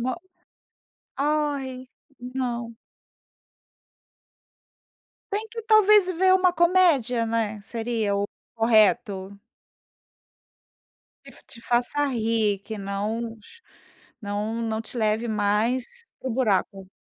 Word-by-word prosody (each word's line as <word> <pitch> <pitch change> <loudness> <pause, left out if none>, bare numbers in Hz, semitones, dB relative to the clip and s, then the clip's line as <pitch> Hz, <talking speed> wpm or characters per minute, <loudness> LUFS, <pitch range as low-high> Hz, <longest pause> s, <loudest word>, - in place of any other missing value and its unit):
Mo 255 +2 -1 1.0
Ai! 280 -3 -1 0.3
Não. 245 -2 -4 2.5
Tem 425 +2 -2
que 460 0 -7
talvez 425 -3 +5
ver 370 +1 +3
uma 365 -1 +3
comédia, 325 -10 +3
né, 220 -2 -2
seria 225 -1 -2
o 200 - 0 0.3
correto. 215 -3 +2 1.9
Que - - -13
f - - -17
te - - -13
faça 245 +5 +1
rir, 225 -5 0
que 220 - -5
não 215 +4 -4
ch 465 - -16 0.6
não 210 +3 -3
não 220 -1 -2
te 225 +2 -8
leve 220 +1 0
mais 225 - 0 0.2
para 260 - -4
o - - -2
buraco. 195 -5 0
235 Hz, 100 wpm, -25 LUFS, 215-285 Hz, 2.5 s, talvez